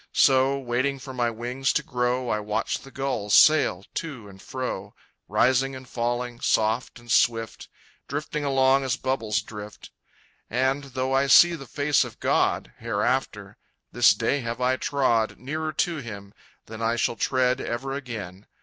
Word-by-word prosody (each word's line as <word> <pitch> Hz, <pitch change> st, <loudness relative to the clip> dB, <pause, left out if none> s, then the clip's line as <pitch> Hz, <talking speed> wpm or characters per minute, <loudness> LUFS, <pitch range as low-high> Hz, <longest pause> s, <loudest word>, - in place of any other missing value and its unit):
So, 135 Hz, 0 st, +4 dB
waiting 130 Hz, +2 st, -1 dB
for 130 Hz, 0 st, -9 dB
my 120 Hz, -2 st, 0 dB
wings 120 Hz, +4 st, -2 dB
to 150 Hz, -, 0 dB
grow, 125 Hz, -1 st, -1 dB
I 105 Hz, -, 0 dB
watch 105 Hz, 0 st, -2 dB
the 135 Hz, -, -13 dB
gulls 135 Hz, -7 st, -1 dB
sail 145 Hz, -11 st, +5 dB
to 140 Hz, -10 st, -5 dB
and 95 Hz, -1 st, -14 dB
fro, 130 Hz, -1 st, -5 dB, 0.3 s
Rising 130 Hz, +1 st, +2 dB
and 130 Hz, 0 st, -10 dB
falling, 120 Hz, 0 st, -3 dB
soft 110 Hz, +3 st, 0 dB
and 120 Hz, -1 st, -9 dB
swift, 115 Hz, -1 st, +1 dB, 0.4 s
Drifting 150 Hz, +1 st, -3 dB
along 135 Hz, -1 st, +3 dB
as 130 Hz, -2 st, -1 dB
bubbles 115 Hz, -5 st, -1 dB
drift. 105 Hz, -1 st, -10 dB, 0.6 s
And, 130 Hz, +4 st, 0 dB
though 130 Hz, 0 st, -3 dB
I 135 Hz, +1 st, +3 dB
see 175 Hz, +5 st, +7 dB
the 140 Hz, -5 st, -7 dB
face 145 Hz, +2 st, +2 dB
of -, -, -10 dB
God -, -, +1 dB
Hereafter -, -, -2 dB, 0.3 s
this -, -, +5 dB
day 145 Hz, -, 0 dB
have 115 Hz, -1 st, -4 dB
I 125 Hz, +1 st, +2 dB
trod 125 Hz, -5 st, 0 dB
Nearer 155 Hz, +5 st, -4 dB
to 170 Hz, +1 st, -1 dB
Him 100 Hz, -7 st, -8 dB, 0.3 s
than 110 Hz, 0 st, -9 dB
I 115 Hz, +1 st, +1 dB
shall 120 Hz, -, 0 dB
tread 130 Hz, 0 st, +1 dB
Ever 130 Hz, +3 st, -4 dB
again. 110 Hz, -8 st, -7 dB
130 Hz, 160 wpm, -25 LUFS, 115-135 Hz, 0.6 s, see